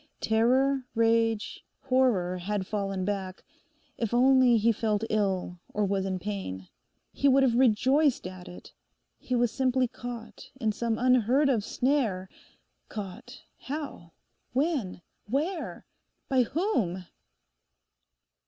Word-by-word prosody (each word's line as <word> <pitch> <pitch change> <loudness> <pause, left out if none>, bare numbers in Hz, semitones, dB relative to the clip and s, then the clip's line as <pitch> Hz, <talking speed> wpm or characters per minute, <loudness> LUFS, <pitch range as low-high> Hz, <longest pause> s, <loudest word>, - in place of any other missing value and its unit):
Terror, 255 +4 +2
rage, 225 -1 +1 0.2
horror 240 -9 +1
had 195 +1 -2
fallen 195 -2 -2
back. 190 -2 -4 0.6
If 230 0 -1
only 255 -1 +5
he 225 +2 +3
felt 215 -1 -1
ill, 190 -4 -1 0.2
or 210 0 +2
was 195 -1 -1
in 190 -1 -2
pain: 185 - -5 0.4
he 280 - +1
would 270 0 +5
have 255 -3 +3
rejoiced 260 +4 +3
at 185 -1 -8
it. 180 - -12 0.5
He 255 - -2
was 240 -2 +2
simply 260 -1 +1
caught 240 -1 -9
in 220 -4 +1
some 225 +1 -2
unheard 255 +3 +3
of 230 -6 +1
snare—caught, 215 -2 -4 0.2
how? 275 - -6 0.4
when? 260 - -1 0.2
where? 315 - -3 0.4
by 260 -1 +3
whom? 235 - -1
230 Hz, 115 wpm, -28 LUFS, 195-260 Hz, 0.6 s, only